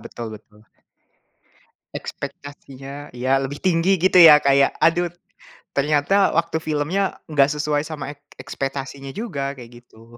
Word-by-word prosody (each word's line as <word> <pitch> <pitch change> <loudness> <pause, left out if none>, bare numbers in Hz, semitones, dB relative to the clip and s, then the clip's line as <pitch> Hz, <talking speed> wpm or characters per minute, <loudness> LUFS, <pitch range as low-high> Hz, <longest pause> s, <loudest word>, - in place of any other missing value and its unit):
betul 115 -2 -8
betul. 105 0 -15 1.3
Ekspektasinya 140 0 -9
ya 130 +2 -1
lebih 145 +2 -5
tinggi 185 +1 +2
gitu 185 +2 +1
ya 150 -2 +10
kayak 140 -1 +2
aduh, 175 +1 +2 0.7
ternyata 150 +7 +2
waktu 165 -1 0
filmnya 160 +5 -2
nggak 140 -2 +3
sesuai 150 0 -1
sama 145 -3 -6
ek - - -42 0.2
ekspektasinya 135 0 -6
juga 140 -11 -4
kayak 120 -1 -14
gitu. 115 +1 -18
145 Hz, 125 wpm, -21 LUFS, 135-160 Hz, 1.3 s, ya